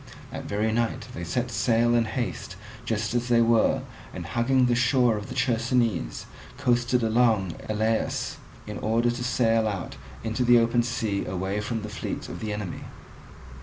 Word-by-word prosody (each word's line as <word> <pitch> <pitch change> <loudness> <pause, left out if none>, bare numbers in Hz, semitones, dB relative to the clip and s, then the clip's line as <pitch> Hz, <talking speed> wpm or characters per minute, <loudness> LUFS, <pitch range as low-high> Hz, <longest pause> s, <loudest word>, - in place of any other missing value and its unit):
That - - -6
very 105 +2 0
night 115 0 -1
they 85 - -6
set 120 +9 -2
sail 115 +2 +2
in 120 -1 +3
haste 115 -6 -4 0.3
just 110 0 -1
as 120 0 0
they 120 -1 +4
were, 115 -1 +3 0.3
and, - - -6
hugging 125 +2 +2
the 125 - +2
shore 120 -1 +3
of 105 0 -5
the - - -6
Chersonese, 115 - 0 0.3
coasted 125 -2 +2
along 110 -5 +3
to 110 - -7
Elaeus, 110 +1 0 0.3
in - - -6
order 115 +2 +2
to 120 +1 -4
sail 115 -3 +2
out 100 -4 -4 0.3
into 110 +2 -1
the 120 0 +6
open 120 +1 +3
sea 110 -4 -1
away 95 +2 -2
from 115 0 -3
the - - -4
fleet 105 - -5
of - - -6
the 110 -1 -3
enemy. 105 -4 -5
115 Hz, 170 wpm, -26 LUFS, 105-120 Hz, 0.3 s, the